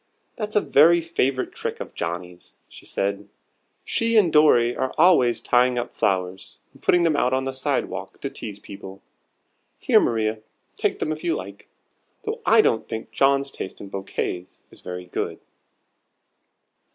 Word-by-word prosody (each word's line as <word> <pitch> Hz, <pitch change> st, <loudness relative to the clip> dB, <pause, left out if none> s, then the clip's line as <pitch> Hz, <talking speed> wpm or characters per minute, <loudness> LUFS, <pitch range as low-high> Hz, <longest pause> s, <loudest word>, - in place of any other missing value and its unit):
"That's 210 Hz, -1 st, -5 dB
a 210 Hz, -, +5 dB
very 170 Hz, +2 st, +5 dB
favorite 135 Hz, -6 st, -1 dB
trick -, -, -5 dB
of -, -, -7 dB
Johnnie's," 90 Hz, +1 st, -6 dB
she -, -, -14 dB
said: 100 Hz, +1 st, -2 dB, 0.6 s
"she 230 Hz, 0 st, +1 dB
and 180 Hz, -7 st, +4 dB
Dorry 120 Hz, -6 st, +5 dB
are 130 Hz, -, -2 dB
always 155 Hz, -8 st, +4 dB
tying 125 Hz, 0 st, +3 dB
up 120 Hz, 0 st, -3 dB
flowers, 95 Hz, -1 st, -2 dB
and -, -, -20 dB
putting 175 Hz, -, +3 dB
them 165 Hz, -3 st, +2 dB
out 130 Hz, -2 st, +1 dB
on 130 Hz, 0 st, 0 dB
the 130 Hz, 0 st, -1 dB
walk -, -, -8 dB
to -, -, -3 dB
tease 105 Hz, -3 st, -7 dB
people. 95 Hz, -1 st, -11 dB, 0.7 s
Here, -, -, +4 dB
Maria, 110 Hz, -1 st, 0 dB, 0.4 s
take -, -, -1 dB
'em 155 Hz, -, -2 dB
if 155 Hz, +1 st, -5 dB
you 170 Hz, -, +1 dB
like. 100 Hz, +2 st, -8 dB, 0.6 s
Though -, -, -4 dB
I -, -, +7 dB
don't 110 Hz, -, +1 dB
think 110 Hz, 0 st, -6 dB
John's 140 Hz, 0 st, +2 dB
taste 95 Hz, -, -7 dB
in 100 Hz, -, -9 dB
bouquets 95 Hz, -2 st, -5 dB
is -, -, -15 dB
very 90 Hz, 0 st, -7 dB
good." 90 Hz, -, -4 dB
120 Hz, 160 wpm, -23 LUFS, 100-155 Hz, 0.7 s, I